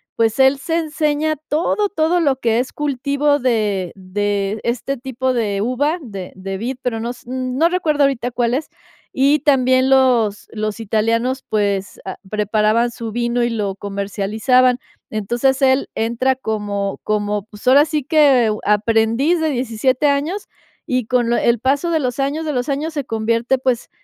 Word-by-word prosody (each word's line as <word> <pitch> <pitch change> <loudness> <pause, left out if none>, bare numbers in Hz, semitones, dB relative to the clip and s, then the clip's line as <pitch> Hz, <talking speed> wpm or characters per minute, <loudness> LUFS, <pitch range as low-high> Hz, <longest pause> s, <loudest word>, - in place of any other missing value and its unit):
pues, 225 +1 +1
él 265 +1 +5
se 325 +3 -1
enseña 310 -1 0
todo, 350 +7 +1
todo 335 0 +1
lo 280 -5 +2
que 230 -1 +1
es 250 - -3
cultivo 285 +1 0
de 210 -8 0
de 200 +2 -2
este 250 +3 -2
tipo 260 +1 -2
de 205 -4 -1
uva, 280 +8 0
de 195 -8 -8
de 190 +1 -5
vid, 245 +5 -3
pero 230 -3 -2
no 235 +2 -3
s 245 - -13
no 255 +5 0
recuerdo 310 -5 +1
ahorita 250 -3 0
cuál 240 0 0
es. 295 +4 -1 0.5
Y 280 +3 +3
también 260 -2 +3
los 245 -6 +3
los 215 0 -3
italianos, 230 +5 0
pues, 200 -2 -1
ah, 190 - -6
preparaban 215 +3 +1
su 230 -1 -6
vino 240 0 0
y 240 - +1
lo 205 -4 -2
comercializaban. 205 +6 +1 0.3
Entonces, 240 +6 0
él 260 +1 +3
entra 235 +4 0
como 205 -5 -3
como, 210 -1 -1
pues, 215 +2 -15
ahora, 280 +3 +7
sí 305 -2 -2
que, 275 -7 +4
aprendiz 225 - +2
de 315 - +1
17 255 +2 0
años 300 +8 -1 0.4
y, 255 -3 -1
con 245 -2 +1
lo 235 - +2
el 235 -2 +2
paso 280 +7 +1
de 320 - +2
los 250 -1 -2
años, 290 +4 -1
de 300 - -2
los 250 0 -1
años, 305 +4 -2
se 285 - -2
convierte, 230 +3 0
pues, 255 -2 -1
245 Hz, 165 wpm, -19 LUFS, 215-275 Hz, 0.5 s, ahora